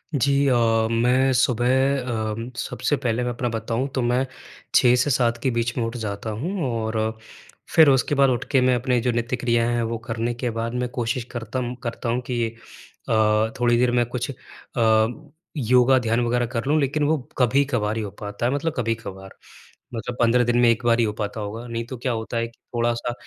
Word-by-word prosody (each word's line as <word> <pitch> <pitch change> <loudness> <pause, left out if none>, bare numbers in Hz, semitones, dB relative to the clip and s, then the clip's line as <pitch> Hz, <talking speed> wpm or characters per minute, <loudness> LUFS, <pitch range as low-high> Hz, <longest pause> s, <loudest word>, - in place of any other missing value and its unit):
जी 140 +2 +2 0.2
अ, 130 - +4 0.4
मैं 125 +3 +3
सुबह 120 -1 +2 0.3
अ, 110 -4 -2 0.2
सबसे 145 - -1
पहले 120 0 0
मैं 125 - -1
अपना 120 +1 -2
बताऊँ 115 +3 -2
तो 130 - +1
मैं 125 +2 +1 0.5
6 125 0 +6
से 145 - -1
7 120 -2 +2
के 130 - +2
बीच 120 0 -1
में 120 - +1
उठ 115 +1 -5
जाता 105 -1 -4
हूँ 180 +3 -2
और 110 -1 -2 0.8
फिर 160 -3 +8
उसके 135 +2 +2
बाद 140 -1 +4
उठ 120 -2 0
के 135 -3 +4
मैं 125 0 +3
अपने 125 0 +1
जो 125 +1 +1
नित्य 120 +1 -1
क्रिया 120 -1 +1
हैं 120 -1 0
वो 115 - -2
करने 115 0 -1
के 120 +1 -3
बाद 115 +1 -2
मैं 125 - -2
कोशिश 120 0 -2
करतम 120 +1 -4
करता 115 0 -3
हूँ 125 +2 0
कि 120 -2 0 0.6
अ, 110 0 +3
थोड़ी 120 -1 +3
देर 125 0 +3
मैं 120 0 +2
कुछ 120 +1 -4
अ, 120 +3 -1 0.3
योगा 125 +1 +4
ध्यान 115 -1 0
वगैरह 120 +1 +1
कर 115 +1 -4
लूँ, 155 +2 +3
लेकिन 145 +1 0
वो 155 +2 +2 0.2
कभी-कभार 125 -4 +1
ही - - -1
हो 100 - -4
पाता 105 +2 -4
है, 125 - +2
मतलब 145 +3 -1
कभी-कभार। 115 -5 -3 0.6
मतलब 115 +2 -4
15 120 +1 +4
दिन 120 0 +1
में 120 - +5
एक 115 +1 +1
बार 120 0 +3
ही 115 - +4
हो 105 - -2
पाता 105 +1 -4
होगा। 110 +3 -6
नहीं 115 0 -3
तो 130 +2 -7
क्या 125 +2 -2
होता 115 0 -3
है 115 - 0
कि 115 - -20 0.2
थोड़ा-सा 120 0 0
120 Hz, 205 wpm, -23 LUFS, 115-125 Hz, 0.8 s, फिर